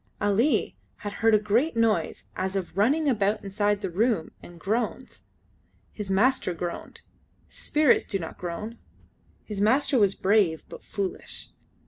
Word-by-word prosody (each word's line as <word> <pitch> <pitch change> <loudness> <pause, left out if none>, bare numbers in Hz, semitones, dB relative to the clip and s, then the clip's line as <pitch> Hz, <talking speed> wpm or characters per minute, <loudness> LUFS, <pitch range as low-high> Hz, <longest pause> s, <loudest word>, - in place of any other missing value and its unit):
Ali 210 +8 +1 0.3
had 205 - -3
heard 225 0 +3
a - - +7
great 230 +7 +1
noise 220 -8 +1
as 190 +1 -2
of 185 -3 -3
running 280 +10 +2
about 215 -4 +1
inside 205 +1 0
the 190 - -2
room 210 -2 0
and 175 -1 -13
groans. 220 +7 -3 0.7
His 205 -3 -6
master 195 -1 +2
groaned. 170 +1 -6 0.5
Spirits 295 -3 +2
do 200 - -2
not 165 -4 -8
groan. 195 +7 -5 0.6
His 205 -2 -5
master 255 +4 +3
was 200 -2 +3
brave, 190 -5 +2
but - - -11
foolish. 195 -3 -5
205 Hz, 140 wpm, -26 LUFS, 190-230 Hz, 0.7 s, a